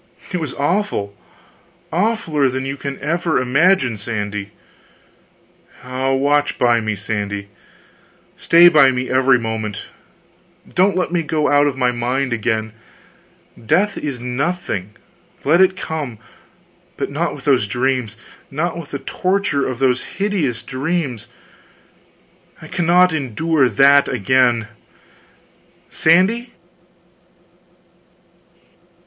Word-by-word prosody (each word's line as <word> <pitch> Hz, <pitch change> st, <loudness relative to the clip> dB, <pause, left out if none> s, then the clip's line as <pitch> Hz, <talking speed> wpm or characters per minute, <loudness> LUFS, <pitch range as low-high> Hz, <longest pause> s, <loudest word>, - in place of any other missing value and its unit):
It -, -, +1 dB
was 155 Hz, -5 st, -4 dB
awful 145 Hz, -, -1 dB, 0.8 s
awfuler 170 Hz, -, +1 dB
than 130 Hz, +1 st, -3 dB
you 135 Hz, 0 st, -3 dB
can 140 Hz, 0 st, -6 dB
ever 165 Hz, +2 st, 0 dB
imagine, 130 Hz, -, +2 dB
Sandy. 105 Hz, -2 st, -4 dB, 1.3 s
Ah, 130 Hz, +1 st, -2 dB
watch 145 Hz, +2 st, +1 dB
by 120 Hz, -1 st, +3 dB
me, 110 Hz, -1 st, -2 dB
Sandy 100 Hz, 0 st, -4 dB, 0.9 s
stay 170 Hz, +1 st, +6 dB
by 150 Hz, -5 st, +6 dB
me 130 Hz, 0 st, -2 dB
every 130 Hz, 0 st, +4 dB
moment 110 Hz, -3 st, -4 dB, 0.8 s
don't 190 Hz, +1 st, +2 dB
let 180 Hz, -, -1 dB
me 175 Hz, -1 st, +1 dB
go 155 Hz, -1 st, 0 dB
out 145 Hz, 0 st, +4 dB
of 135 Hz, -2 st, -2 dB
my 125 Hz, -1 st, +2 dB
mind 125 Hz, +2 st, -1 dB
again; 110 Hz, -1 st, -2 dB, 0.9 s
death 190 Hz, -, +1 dB
is 140 Hz, -5 st, -4 dB
nothing, 125 Hz, -, -3 dB, 0.5 s
let 165 Hz, +6 st, +4 dB
it 190 Hz, 0 st, +3 dB
come, 150 Hz, -10 st, -5 dB, 0.8 s
but -, -, -3 dB
not -, -, -2 dB
with -, -, -12 dB
those 130 Hz, -7 st, +2 dB
dreams, 125 Hz, -1 st, -1 dB, 0.3 s
not 160 Hz, +5 st, -2 dB
with 160 Hz, -, -9 dB
the 140 Hz, -, -4 dB
torture 180 Hz, +1 st, -1 dB
of 130 Hz, -2 st, -4 dB
those 130 Hz, -1 st, +1 dB
hideous 170 Hz, -, -1 dB
dreams 135 Hz, -4 st, -3 dB, 1.3 s
I -, -, -11 dB
cannot 180 Hz, 0 st, +3 dB
endure 145 Hz, 0 st, +1 dB
that 140 Hz, +6 st, +5 dB
again.... 120 Hz, 0 st, +2 dB, 1.2 s
Sandy?..." 190 Hz, +9 st, +2 dB
135 Hz, 110 wpm, -19 LUFS, 120-165 Hz, 1.3 s, stay